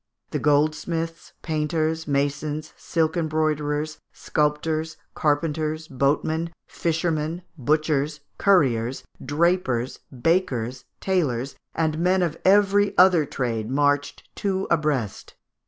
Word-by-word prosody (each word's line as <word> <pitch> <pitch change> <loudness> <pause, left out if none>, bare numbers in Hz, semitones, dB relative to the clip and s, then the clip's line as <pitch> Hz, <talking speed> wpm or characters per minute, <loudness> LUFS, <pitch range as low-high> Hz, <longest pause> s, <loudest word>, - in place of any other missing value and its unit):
The - - -1
goldsmiths, 155 +3 0
painters, 160 0 -1
masons, 145 +2 -1
silk 160 -1 0
embroiderers, 155 -2 -1
sculptors, 155 +1 -1 0.2
carpenters, 155 +1 0
boatmen, 155 +5 0
fishermen, 165 0 -1
butchers, 150 +1 0 0.2
curriers, 130 - +2 0.2
drapers, 145 -6 +1
bakers, 130 -4 0 0.2
tailors, 140 -9 0 0.2
and 160 -1 0
men 180 +2 +3
of 165 -2 -1
every 205 +1 +4
other 180 -5 +6
trade 115 -5 -2
marched 145 +1 0
two 195 -1 -1
abreast. 150 - -1
155 Hz, 90 wpm, -24 LUFS, 145-165 Hz, 0.2 s, other